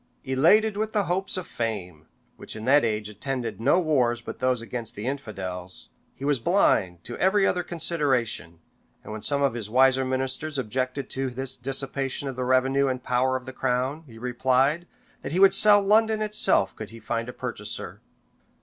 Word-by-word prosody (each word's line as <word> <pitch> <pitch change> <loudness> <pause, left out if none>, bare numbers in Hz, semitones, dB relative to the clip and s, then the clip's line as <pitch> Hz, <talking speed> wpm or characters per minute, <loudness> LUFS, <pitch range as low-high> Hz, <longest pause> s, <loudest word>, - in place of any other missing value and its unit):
Elated 200 +11 +3
with 220 +1 -2
the 210 -2 +2
hopes 185 +2 +1
of 185 - -4
fame, 90 -9 -5 0.3
which - - -7
in 110 0 -7
that 145 +3 +5
age 105 -2 -1
attended 120 +2 -4
no 140 +9 +4
wars 130 -8 +1
but 120 - -8
those 130 -1 +1
against 115 0 -5
the 105 - -6
infidels, 95 -9 -5 0.3
he 135 - -7
was 145 -3 +1
blind 100 - +2
to 120 - -6
every 195 +1 +3
other 180 - +1
consideration; 145 - -1 0.5
and - - -9
when 110 0 -6
some 140 +3 +1
of 140 - +2
his 115 -3 -5
wiser 130 +2 +4
ministers 130 +3 -2
objected 130 +2 -2
to 135 0 -2
this 130 +1 -4
dissipation 135 +2 -2
of 135 - -4
the 125 - -3
revenue 135 +2 +2
and 130 -1 -3
power 130 +1 +1
of 130 -1 -4
the 130 - -8
crown, 130 +4 -1
he 115 -3 -13
replied, 130 +7 +1 0.3
that 140 - -5
he 180 - +1
would 195 0 +7
sell 210 -1 +7
London 220 +2 +3
itself 215 0 +1
could 110 - -8
he 115 - -12
find 115 +1 -3
a - - -4
purchaser. - - -5
130 Hz, 185 wpm, -25 LUFS, 120-150 Hz, 0.5 s, would